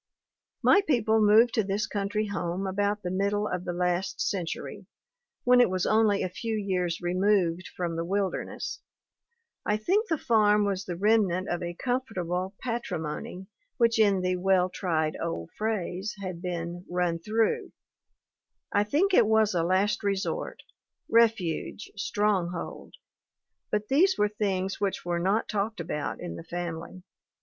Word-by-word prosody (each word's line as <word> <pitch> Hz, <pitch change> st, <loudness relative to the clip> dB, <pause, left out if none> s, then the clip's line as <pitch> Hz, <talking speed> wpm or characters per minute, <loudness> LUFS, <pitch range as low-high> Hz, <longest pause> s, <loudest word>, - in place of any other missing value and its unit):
My 400 Hz, -, +6 dB
people 225 Hz, -6 st, +3 dB
moved 220 Hz, +3 st, +6 dB
to 220 Hz, -, +2 dB
this 200 Hz, +2 st, -1 dB
country 205 Hz, +1 st, -2 dB
home 190 Hz, -2 st, -3 dB
about 205 Hz, +2 st, -1 dB
the 180 Hz, -, -2 dB
mid 195 Hz, +2 st, +1 dB
dle 205 Hz, +1 st, -1 dB
of 180 Hz, -2 st, -3 dB
the 180 Hz, -, -2 dB
last 180 Hz, +1 st, -1 dB
century, 180 Hz, -4 st, -3 dB, 0.6 s
when 250 Hz, 0 st, +6 dB
it 245 Hz, -, +4 dB
was 185 Hz, -1 st, -1 dB
only 215 Hz, -2 st, +3 dB
a -, -, 0 dB
few 220 Hz, +5 st, -4 dB
years 180 Hz, -4 st, -1 dB
removed 180 Hz, -1 st, +1 dB
from 170 Hz, -2 st, -2 dB
the 165 Hz, -, -2 dB
wilderness; 195 Hz, +2 st, -3 dB, 0.8 s
I 210 Hz, -, +1 dB
think 395 Hz, -, +1 dB
the 325 Hz, -, +1 dB
farm 210 Hz, -5 st, +3 dB
was 200 Hz, -1 st, -2 dB
the 175 Hz, -, -4 dB
remnant 195 Hz, -2 st, +2 dB
of 175 Hz, -, -2 dB
a 175 Hz, 0 st, -4 dB
comfortable 190 Hz, -7 st, -2 dB
patrimony 185 Hz, -7 st, -4 dB, 0.3 s
which 230 Hz, -2 st, +3 dB
in 200 Hz, -3 st, +4 dB
the 185 Hz, 0 st, 0 dB
well 185 Hz, 0 st, +2 dB
tried 160 Hz, -5 st, -1 dB
old 165 Hz, -, -4 dB
phrase 210 Hz, -2 st, -2 dB
had 185 Hz, -3 st, -5 dB
been 175 Hz, -1 st, -4 dB
'run 175 Hz, -1 st, 0 dB
through'; 215 Hz, +5 st, 0 dB, 1.0 s
I 205 Hz, -, +4 dB
think 340 Hz, -, +1 dB
it 225 Hz, -, +6 dB
was 220 Hz, -1 st, +3 dB
a 175 Hz, -, +1 dB
last 190 Hz, +5 st, +1 dB
resort, 200 Hz, -2 st, -2 dB, 0.5 s
refuge, 220 Hz, -4 st, +1 dB
stronghold; 195 Hz, -4 st, -2 dB, 0.7 s
but 210 Hz, 0 st, -1 dB
these 360 Hz, +8 st, +4 dB
were 210 Hz, 0 st, +2 dB
things 195 Hz, -2 st, -2 dB
which 200 Hz, -3 st, -1 dB
were 175 Hz, -1 st, 0 dB
not 195 Hz, +6 st, +1 dB
talked 210 Hz, 0 st, -2 dB
about 150 Hz, -3 st, -3 dB
in 175 Hz, -, -6 dB
the -, -, -8 dB
family. 175 Hz, +1 st, -6 dB
195 Hz, 150 wpm, -28 LUFS, 180-215 Hz, 1.0 s, My